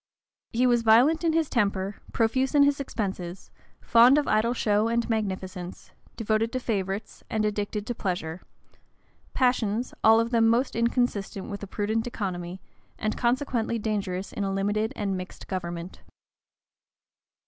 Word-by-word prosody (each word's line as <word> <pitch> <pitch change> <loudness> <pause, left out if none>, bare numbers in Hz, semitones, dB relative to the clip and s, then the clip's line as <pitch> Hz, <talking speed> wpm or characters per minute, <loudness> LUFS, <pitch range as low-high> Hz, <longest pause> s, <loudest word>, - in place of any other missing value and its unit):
He 250 0 +2
was 240 -1 +4
violent 245 +9 +5
in 330 -1 +2
his 325 -1 +2
temper, 200 -5 0
profuse 260 +5 +1
in 285 - +7
his 285 0 +2
expenses, 190 -8 -4 0.3
fond 240 +4 +6
of 295 - +1
idle 230 +3 +2
show 210 -1 +2
and 235 0 0
magnificence, 190 -5 -4 0.2
devoted 225 0 0
to 255 - 0
favorites, 200 -3 -3
and 220 -1 0
addicted 205 0 -2
to 240 - -2
pleasure; 175 -5 -3 0.9
passions, 245 -2 +1
all 225 +1 +7
of 230 +1 0
them 230 -2 +4
the - - +5
most 255 +2 -2
inconsistent 230 -5 -1
with 200 - -6
a 200 - -6
prudent 220 +4 -1
economy, 185 -5 -4 0.4
and 215 - -2
consequently 240 -2 0
dangerous 200 -4 -3
in 205 - -3
a 195 - -1
limited 205 +3 0
and 200 -2 -2
mixed 185 0 -8
government. 175 -1 -5
220 Hz, 150 wpm, -26 LUFS, 195-235 Hz, 0.9 s, in